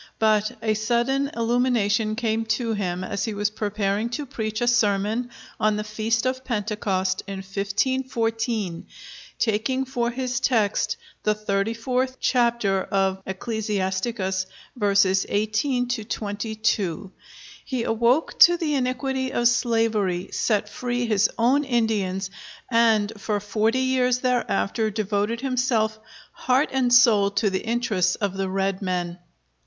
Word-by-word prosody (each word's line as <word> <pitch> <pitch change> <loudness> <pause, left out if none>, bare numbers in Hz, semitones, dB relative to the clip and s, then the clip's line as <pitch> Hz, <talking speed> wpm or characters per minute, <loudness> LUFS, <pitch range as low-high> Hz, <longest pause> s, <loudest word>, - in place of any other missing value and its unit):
But 215 +2 +2
a 220 -1 +2
sudden 240 +6 +1
illumination 230 -2 +1
came 225 -1 0
to 230 -3 -2
him 185 -3 -2
as 200 +1 -2
he 220 -2 -4
was 205 0 0
preparing 210 +1 -1
to 295 - -5
preach 220 -4 -4
a 240 - 0
sermon 220 0 +1 0.3
on 215 0 +2
the 210 - -2
Feast 220 +2 -1
of 260 0 -1
Pentecost, 205 -5 -1
in 200 - -5
1514, 225 -1 -1 0.5
taking 240 +4 0
for 245 -2 -1
his 250 0 -2
text 215 -6 +1 0.2
the 215 0 +1
34th 230 +5 -1
chapter 235 -6 +2
of 190 -1 0
Ecclesiasticus, 190 -1 -2 0.3
verses 200 -4 +3
18 220 +5 0
to 245 -3 -2
22. 205 -3 -2 0.5
He 255 -4 -3
awoke 235 +7 +1
to 345 0 +8
the 320 -3 -1
iniquity 260 0 -1
of 240 - +3
slavery, 225 -6 +1
set 210 -2 0
free 245 +3 -2
his 210 -2 +2
own 255 +5 +3
Indians, 210 -7 0 0.4
and 225 -2 +3
for 210 0 -1
forty 220 +4 0
years 255 -1 +2
thereafter 240 -4 0
devoted 210 +2 -1
himself 245 -5 0 0.3
heart 260 +4 +1
and 255 -2 +1
soul 230 -5 +6
to 200 0 0
the 190 - -2
interests 220 -6 +1
of 200 -2 -2
the 195 -1 -2
red 195 0 -1
men. 180 -2 -2
220 Hz, 130 wpm, -24 LUFS, 200-245 Hz, 0.5 s, to